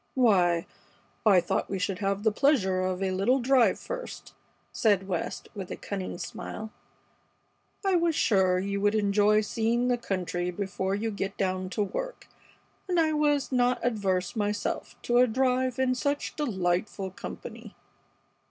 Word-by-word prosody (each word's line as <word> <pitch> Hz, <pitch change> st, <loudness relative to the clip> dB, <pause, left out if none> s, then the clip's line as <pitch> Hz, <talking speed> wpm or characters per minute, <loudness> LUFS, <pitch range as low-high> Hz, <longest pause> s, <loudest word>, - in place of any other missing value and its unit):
"Why, 180 Hz, -9 st, +3 dB, 0.6 s
I 195 Hz, -3 st, +7 dB
thought -, -, -1 dB
we 195 Hz, -, -2 dB
should 185 Hz, +1 st, -2 dB
have 200 Hz, 0 st, -1 dB
the 220 Hz, -, +4 dB
pleasure 205 Hz, -7 st, +2 dB
of 185 Hz, +1 st, -1 dB
a 190 Hz, -, 0 dB
little 195 Hz, +8 st, +2 dB
drive 255 Hz, -1 st, +4 dB
first," -, -, -7 dB, 0.4 s
said 200 Hz, -4 st, +2 dB
West, 180 Hz, -4 st, -3 dB
with 195 Hz, -4 st, -6 dB
a -, -, -4 dB
cunning 190 Hz, -3 st, -5 dB
smile. 215 Hz, +4 st, -6 dB, 1.1 s
"I 385 Hz, -2 st, +4 dB
was 335 Hz, -2 st, +1 dB
sure 190 Hz, -9 st, +3 dB
you 200 Hz, +2 st, -2 dB
would 205 Hz, +1 st, +2 dB
enjoy 210 Hz, 0 st, +3 dB
seeing 230 Hz, +3 st, 0 dB
the 245 Hz, -1 st, +1 dB
country 180 Hz, -4 st, -2 dB
before 190 Hz, +1 st, -2 dB
you 220 Hz, +2 st, -2 dB
get 195 Hz, -1 st, -4 dB
down 185 Hz, -1 st, -1 dB
to 210 Hz, -, +3 dB
work, -, -, -5 dB, 0.6 s
and 360 Hz, -2 st, +1 dB
I 315 Hz, -1 st, +3 dB
was 295 Hz, -2 st, +1 dB
not 250 Hz, -1 st, +2 dB
averse 195 Hz, -5 st, 0 dB
myself 205 Hz, -1 st, -2 dB
to 240 Hz, 0 st, +3 dB
a 250 Hz, -, +6 dB
drive 255 Hz, +1 st, +1 dB
in 260 Hz, -1 st, +2 dB
such 285 Hz, +3 st, -2 dB
delightful 190 Hz, -, -1 dB
company." -, -, -9 dB
210 Hz, 150 wpm, -28 LUFS, 190-250 Hz, 1.1 s, I